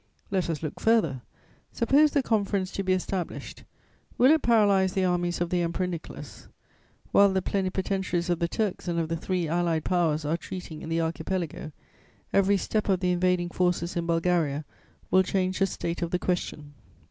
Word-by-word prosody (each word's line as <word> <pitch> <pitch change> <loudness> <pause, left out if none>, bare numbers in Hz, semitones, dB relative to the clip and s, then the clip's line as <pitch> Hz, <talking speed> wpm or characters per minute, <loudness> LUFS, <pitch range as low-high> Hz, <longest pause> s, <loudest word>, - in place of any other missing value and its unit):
Let 185 -3 0
us 165 -1 -3
look 155 - -5
further, 205 - +2 0.5
suppose 285 +6 +4
the 285 -2 +1
conference 200 -4 0
to - - -3
be 190 - 0
established: 185 -1 -4 0.5
will 255 +4 +6
it 315 -1 +4
paralyze 200 -5 +3
the 190 -2 +1
armies 175 -1 0
of 175 - -1
the 180 -1 +1
Emperor 170 +2 -1
Nicholas? 175 -3 -8 0.6
While 200 -1 +6
the 190 -1 0
plenipotentiaries 190 -2 -1
of 175 -2 0
the 170 - +1
Turks 200 0 -2
and 170 -1 -1
of 165 -1 -1
the 165 - 0
three 175 +1 -2
Allied 165 -1 0
Powers 160 -4 +1
are 160 +3 0
treating 170 -3 -8
in 160 - -7
the 165 0 +1
Archipelago, 160 -1 -3 0.6
every 195 0 +4
step 210 +3 -1
of 190 -2 +3
the 180 -1 +2
invading 180 0 +1
forces 180 -1 0
in 170 -1 -2
Bulgaria 165 -4 +1 0.5
will 190 - +6
change 185 0 -1
the 195 - +3
state 170 -2 -4
of 170 - -1
the 180 - 0
question. 155 -5 -3
180 Hz, 180 wpm, -27 LUFS, 170-190 Hz, 0.6 s, will